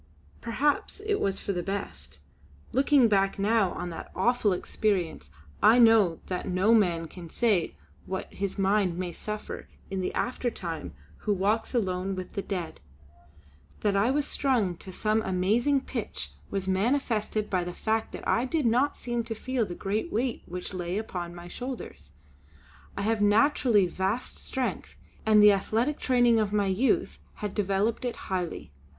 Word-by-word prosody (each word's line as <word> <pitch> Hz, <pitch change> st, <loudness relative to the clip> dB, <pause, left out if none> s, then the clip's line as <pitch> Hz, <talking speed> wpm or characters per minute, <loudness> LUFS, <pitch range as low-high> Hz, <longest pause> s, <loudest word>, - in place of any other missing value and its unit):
Perhaps 280 Hz, -, 0 dB
it 420 Hz, -1 st, 0 dB
was 195 Hz, -1 st, 0 dB
for 200 Hz, -, -2 dB
the 175 Hz, -, -1 dB
best; 75 Hz, -, -4 dB, 0.5 s
looking 270 Hz, -1 st, +4 dB
back 195 Hz, -2 st, +2 dB
now 205 Hz, -1 st, +2 dB
on 175 Hz, 0 st, -5 dB
that 165 Hz, -, -8 dB
awful 220 Hz, +2 st, +2 dB
experience, 180 Hz, -, -1 dB, 0.3 s
I 220 Hz, +3 st, +7 dB
know 225 Hz, -8 st, +5 dB
that 180 Hz, -1 st, -4 dB
no 185 Hz, +5 st, +3 dB
man 175 Hz, -7 st, +3 dB
can 170 Hz, 0 st, -10 dB
say 210 Hz, -7 st, +1 dB, 0.3 s
what 190 Hz, 0 st, -3 dB
his 200 Hz, 0 st, -3 dB
mind 195 Hz, -2 st, +2 dB
may 180 Hz, -1 st, -3 dB
suffer 210 Hz, +4 st, -6 dB, 0.2 s
in 190 Hz, -1 st, -1 dB
the 180 Hz, -, -1 dB
aftertime 170 Hz, -, -3 dB, 0.2 s
who 210 Hz, -, -2 dB
walks 210 Hz, +6 st, 0 dB
alone 190 Hz, -3 st, 0 dB
with 185 Hz, -1 st, -7 dB
the 200 Hz, -, -2 dB
Dead. 180 Hz, -5 st, -4 dB, 1.0 s
That 205 Hz, -1 st, +1 dB
I 200 Hz, +4 st, +3 dB
was 285 Hz, +2 st, +1 dB
strung 240 Hz, -12 st, +1 dB
to 190 Hz, -, -10 dB
some 215 Hz, +3 st, +1 dB
amazing 220 Hz, +9 st, +2 dB
pitch 210 Hz, -, -5 dB, 0.2 s
was 195 Hz, -1 st, -3 dB
manifested 215 Hz, +1 st, 0 dB
by 185 Hz, -2 st, 0 dB
the 175 Hz, -, -4 dB
fact 220 Hz, +4 st, -1 dB
that -, -, -7 dB
I 240 Hz, -, +2 dB
did 300 Hz, +1 st, 0 dB
not 250 Hz, +5 st, +2 dB
seem 240 Hz, -1 st, -2 dB
to 225 Hz, -, -4 dB
feel 250 Hz, -1 st, -1 dB
the 175 Hz, -, -6 dB
great 210 Hz, -, -2 dB
weight 240 Hz, +2 st, -1 dB
which 180 Hz, +2 st, -6 dB
lay 180 Hz, +1 st, -3 dB
upon 175 Hz, -5 st, -4 dB
my 175 Hz, 0 st, -9 dB
shoulders. 225 Hz, -, -7 dB, 0.8 s
I 200 Hz, -, -1 dB
have 220 Hz, 0 st, +1 dB
naturally 215 Hz, -1 st, +4 dB
vast 190 Hz, +7 st, -2 dB
strength 260 Hz, -1 st, -3 dB, 0.3 s
and 210 Hz, -1 st, +7 dB
the 210 Hz, -, +9 dB
athletic 225 Hz, +8 st, 0 dB
training 245 Hz, -3 st, +4 dB
of 210 Hz, -2 st, 0 dB
my 205 Hz, -1 st, +2 dB
youth 265 Hz, -, +1 dB, 0.2 s
had 205 Hz, -2 st, -4 dB
developed 205 Hz, +3 st, 0 dB
it 245 Hz, -1 st, -2 dB
highly. 180 Hz, -, -4 dB
205 Hz, 160 wpm, -28 LUFS, 185-235 Hz, 1.0 s, the